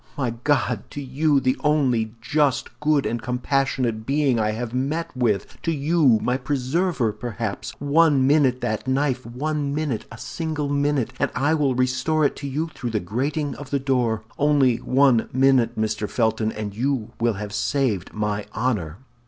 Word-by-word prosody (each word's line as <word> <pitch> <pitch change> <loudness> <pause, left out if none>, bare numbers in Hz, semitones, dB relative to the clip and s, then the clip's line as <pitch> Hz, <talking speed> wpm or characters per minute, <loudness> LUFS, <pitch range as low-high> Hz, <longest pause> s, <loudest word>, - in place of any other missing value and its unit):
My 130 -4 0
God! 120 -2 0
to - - -7
you—the 135 -1 +1
only 125 -7 +1
just, 145 +2 0
good, 150 -2 +2
and 120 0 -2
compassionate 125 -2 -1
being 135 -1 +1
I 105 -1 +1
have 115 +2 -4
met 145 +5 -2
with! 115 -6 -1
To 165 - -1
you—my 140 -6 +2
preserver, 135 - 0
perhaps! 110 -2 -5
One 145 -1 +4
minute 135 -3 +3
that 110 +3 -2
knife, 130 -1 0
one 145 +3 -2
minute, 145 -7 -2
a 115 - -9
single 155 +1 -3
minute, 140 -3 0
and - - +1
I 145 +3 +2
will 145 -5 +1
restore 130 +5 +1
it 140 - +1
to 140 - -5
you 155 +5 -2
through 120 - -4
the 110 -2 0
grating 135 - -2
of 145 -2 -9
the 140 - +1
door. 125 -5 0 0.2
Only 140 -5 +3
one 130 -3 +3
minute, 130 -3 +3
Mr. 110 -1 -1
Felton, 110 -2 0
and 105 -2 -5
you 120 -2 -1
will 115 0 +2
have 105 +1 -6
saved 120 -9 0
my 105 -1 -2
honor!" 105 -9 -1
130 Hz, 160 wpm, -23 LUFS, 115-145 Hz, 0.2 s, One